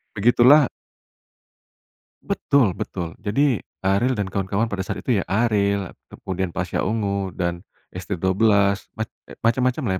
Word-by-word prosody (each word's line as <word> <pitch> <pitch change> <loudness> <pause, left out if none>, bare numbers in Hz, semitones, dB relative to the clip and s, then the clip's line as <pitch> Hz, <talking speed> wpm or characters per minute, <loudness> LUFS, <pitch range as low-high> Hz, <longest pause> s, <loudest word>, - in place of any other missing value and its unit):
Begitulah 120 +6 +6 1.6
Betul 125 -9 +2
betul. 85 -2 -5
Jadi 120 +4 +1 0.2
Ariel 110 +6 +2
dan 105 - 0
kawan-kawan 100 +3 -1
pada 100 -3 -3
saat 95 - -4
itu, 115 -7 +2
ya, - - -4
Ariel, 100 -3 +1 0.2
kemudian 95 -1 -4
Pasha 90 +1 -3
Ungu 100 -3 -1
dan 85 -1 -3 0.3
ST12, 100 +2 +1
mac 110 +1 -2 0.4
macam-macam, 125 +4 +1
lah, 95 - +1
100 Hz, 120 wpm, -22 LUFS, 95-115 Hz, 1.6 s, Begitulah